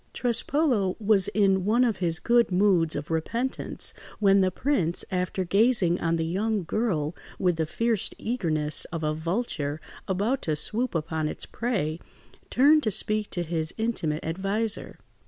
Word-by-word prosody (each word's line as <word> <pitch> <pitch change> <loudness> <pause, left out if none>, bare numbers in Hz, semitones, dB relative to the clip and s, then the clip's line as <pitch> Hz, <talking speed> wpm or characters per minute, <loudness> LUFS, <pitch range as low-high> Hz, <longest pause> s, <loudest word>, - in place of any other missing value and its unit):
Trespolo 240 - +1
was 205 -3 +4
in 195 -2 +2
one 225 +6 +3
of 230 -5 +1
his 170 -3 0
good 235 +2 +2
moods 180 -4 +3
of 145 +2 -5
repentance, 230 +11 -2 0.2
when 195 -2 +4
the 185 - +3
prince, 185 - 0
after 185 0 -1
gazing 195 -2 +3
on 165 0 +1
the 165 -1 -1
young 200 +4 -1
girl 170 -5 -1 0.2
with 180 -3 +1
the 160 -1 -1
fierce 230 +3 0
eagerness 155 -10 -1
of 165 -1 -5
a 155 0 0
vulture 160 -3 -2 0.3
about 210 +8 0
to 155 - -1
swoop 225 +9 -2
upon 160 -1 -1
its - - -5
prey, 190 -10 -2 0.5
turned 295 +4 +5
to 225 - 0
speak 215 +1 0
to 175 - -2
his 160 -1 -1
intimate 195 -9 -1
adviser. 195 +6 -2
190 Hz, 155 wpm, -26 LUFS, 165-225 Hz, 0.5 s, turned